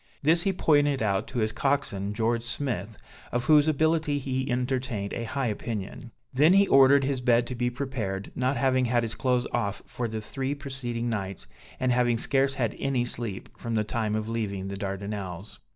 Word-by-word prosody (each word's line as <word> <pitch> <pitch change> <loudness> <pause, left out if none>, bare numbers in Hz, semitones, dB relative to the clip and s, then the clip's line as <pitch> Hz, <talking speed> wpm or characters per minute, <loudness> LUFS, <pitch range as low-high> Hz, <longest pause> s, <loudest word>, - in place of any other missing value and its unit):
This 165 +4 +4
he 195 - +2
pointed 145 -7 +2
out 100 -2 0
to 130 - -6
his 110 -2 +1
coxswain, 110 -7 -1
George 115 +1 +1
Smith, 115 -4 -4 0.3
of 120 0 -1
whose 150 +1 +6
ability 155 0 +2
he 130 -1 -2
entertained 125 -4 -1
a 115 - -3
high 135 +3 -2
opinion. 110 +2 -4 0.2
Then 150 +7 +5
he 200 0 +5
ordered 135 +1 +6
his 135 -1 -1
bed 120 -1 +3
to 125 - -5
be 120 0 0
prepared, 120 -7 -4
not 130 +2 0
having 130 -1 +2
had 120 0 +2
his 115 -1 -3
clothes 125 0 +1
off 100 -4 -2
for 120 - -4
the 110 0 -4
three 135 +5 -3
preceding 130 -4 -4
nights, 95 - -4 0.3
and 130 -1 +1
having 120 -1 +2
scarce 135 +3 +1
had 115 -4 -1
any 130 -3 0
sleep 115 -5 -4
from 115 -1 -3
the 110 - +2
time 110 0 -1
of 110 0 -2
leaving 100 -4 -3
the 100 - -4
Dardanelles. 100 -1 -5
120 Hz, 185 wpm, -27 LUFS, 110-135 Hz, 0.3 s, whose